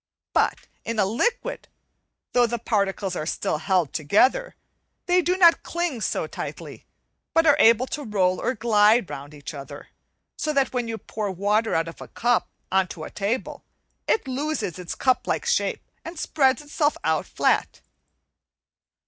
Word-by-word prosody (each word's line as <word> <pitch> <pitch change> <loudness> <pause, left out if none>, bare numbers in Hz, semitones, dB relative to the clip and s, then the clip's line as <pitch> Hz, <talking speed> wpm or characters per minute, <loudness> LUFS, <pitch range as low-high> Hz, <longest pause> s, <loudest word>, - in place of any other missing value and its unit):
But - - +2 0.2
in 230 0 -4
a 205 - +3
liquid, 475 - -1 0.7
though 245 -1 +4
the 235 +1 -2
particles 200 -4 -1
are 155 - -3
still 155 - -1
held 180 -3 +1
together, 255 - +2 0.5
they 360 0 +3
do 360 +2 0
not 340 -3 +6
cling 340 -8 -3
so - - -1
tightly, - - -8 0.5
but 325 0 +5
are 290 - +6
able 230 +2 +6
to 290 +2 -5
roll 185 -4 +1
or 255 - 0
glide 215 -1 +3
round 145 +2 -8
each 145 +1 -8
other, 140 -2 -9 0.5
so 305 - -1
that 275 -2 +1
when 245 -2 -1
you 225 -1 -3
pour 215 -1 -4
water 205 +4 +1
out 165 0 +1
of 165 - -10
a - - -8
cup 240 0 0 0.2
on 190 0 +3
to 160 - -8
a - - -8
table, 210 +5 -3 0.4
it 440 - +1
loses 265 - -2
its 180 -2 -5
cuplike 260 - 0
shape 480 0 0 0.2
and 330 +1 -8
spreads 280 -2 +1
itself 295 0 0
out - - 0
flat. - - 0
230 Hz, 160 wpm, -24 LUFS, 190-295 Hz, 0.7 s, not